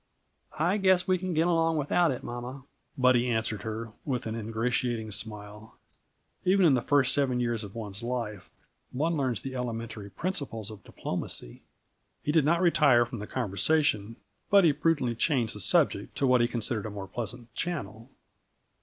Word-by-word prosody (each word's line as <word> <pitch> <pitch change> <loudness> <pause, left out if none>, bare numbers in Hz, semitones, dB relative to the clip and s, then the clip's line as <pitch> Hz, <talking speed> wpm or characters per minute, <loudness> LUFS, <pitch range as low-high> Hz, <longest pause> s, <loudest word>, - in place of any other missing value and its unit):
"I 175 +6 +2
guess 190 -2 +3
we 185 -1 +2
can 185 -2 -3
get 160 +2 +3
along 165 -2 +2
without 160 +4 +2
it, 130 - -3
mamma," 125 +3 -6 0.3
Buddy 125 -1 +4
answered 110 -3 -1
her, 110 +1 -5
with 130 -4 -2
an 110 - -3
ingratiating 115 0 -1
smile. 105 0 -6 0.7
Even 190 0 +4
in 155 - +6
the 125 - +2
first 135 +1 +3
seven 135 -3 +1
years 120 -2 -1
of 100 0 -9
one's 105 -4 -5
life, 115 -5 -4 0.4
one 160 +6 0
learns 130 -7 -1
the 135 - -5
elementary 115 -4 -4
principles 125 - -4
of 105 -3 -11
diplomacy. - - -5 0.6
He 150 - 0
did 155 -2 +3
not 170 +3 +3
retire 145 -8 +5
from 120 -1 -7
the 105 - -6
conversation, 115 -1 +1 0.3
but 200 -1 +6
he 160 -4 +5
prudently 145 -5 +1
changed 120 -2 +1
the 105 - -6
subject 90 - +1
to 140 - +2
what 125 -2 +4
he 120 - +3
considered 115 -2 -1
a - - -5
more 100 -2 -7
pleasant 120 +3 -6
channel. 130 -8 -4
125 Hz, 170 wpm, -28 LUFS, 110-150 Hz, 0.7 s, in